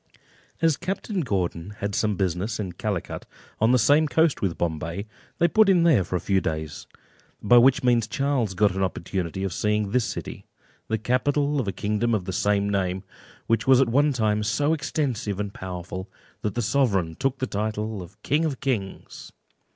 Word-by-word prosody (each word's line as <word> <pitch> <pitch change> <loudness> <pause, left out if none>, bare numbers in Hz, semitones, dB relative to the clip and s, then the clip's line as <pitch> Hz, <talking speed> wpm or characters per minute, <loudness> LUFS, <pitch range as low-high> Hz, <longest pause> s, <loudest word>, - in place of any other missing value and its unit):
As 160 -3 +4
Captain 190 +2 -3
Gordon 95 - -2
had 100 -1 -3
some 105 0 +1
business 95 +3 -1
at 90 -4 -5
Calicut, 100 -5 -3 0.3
on 110 +2 +4
the 125 - +5
same 145 +7 +4
coast 160 0 +2
with 95 -4 -1
Bombay, 85 +3 -3 0.3
they 170 - +4
put 215 +4 +4
in 180 -3 +5
there 155 - +4
for 90 - -4
a - - +1
few 95 +1 +1
days, 80 -2 -4 0.5
by 120 +3 +6
which 130 +2 +4
means 120 -3 +3
Charles 135 -7 -1
got 100 +1 +3
an 95 - -1
opportunity 95 0 -2
of 95 -3 -2
seeing 105 0 0
this 125 -1 +2
city, - - -6 0.4
the 110 - 0
capital 140 +5 +1
of 125 - -2
a - - 0
kingdom 105 +5 0
of 95 -4 -2
the 95 - -4
same 100 +1 +1
name, 95 -2 -1 0.4
which 115 +1 0
was 130 -1 +7
at 135 -3 +3
one 145 +5 +3
time 110 -4 +1
so 145 +9 +1
extensive 130 -9 -2
and 105 -1 -3
powerful, 95 +1 -6 0.3
that 105 - -2
the 120 - 0
sovereign 100 -9 +1
took 135 +8 -1
the 130 - -1
title 105 -1 -3
of 95 +4 -12
"King 150 +4 +1
of 150 -5 -2
Kings." 110 -8 -4
105 Hz, 185 wpm, -25 LUFS, 95-135 Hz, 0.5 s, was